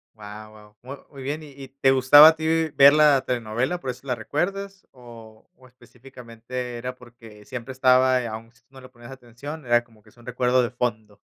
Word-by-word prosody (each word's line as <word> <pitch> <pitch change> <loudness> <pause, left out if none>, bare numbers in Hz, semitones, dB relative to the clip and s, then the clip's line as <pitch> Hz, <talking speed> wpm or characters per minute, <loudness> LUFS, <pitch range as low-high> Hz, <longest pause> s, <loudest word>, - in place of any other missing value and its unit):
Guau, 105 0 -11
guau, 105 -1 -17
mu 135 +3 -9 0.2
muy 135 -2 -12
bien. 150 +3 -5
¿Y 145 - -13
y 135 -1 -12
te 135 0 0
gustaba 140 +4 +7
a 160 - -1
ti 160 0 -1
ver 140 +1 +7
la 150 -3 +4
telenovela?, 125 +7 -3
¿por 130 - -7
eso 125 +2 -15
la 125 - -1
recuerdas? 195 - -5
¿O 115 -3 -16
o 130 - -19
específicamente 125 -1 -10
era 125 +1 -7
porque 115 -4 -17
siempre 130 -1 -8
estaba, 130 0 +2
aún 115 +1 -9
si 120 - -30
tú - - -47
no 135 -1 -15
le 130 - -14
ponías 120 0 -15
atención, 130 +4 -11
era 120 0 +2
como 110 -3 -26
que 105 - -21
es 120 - -28
un 120 - -19
recuerdo 125 0 0
de 120 - -2
fondo? 110 -4 -5
125 Hz, 210 wpm, -23 LUFS, 115-135 Hz, 0.2 s, gustaba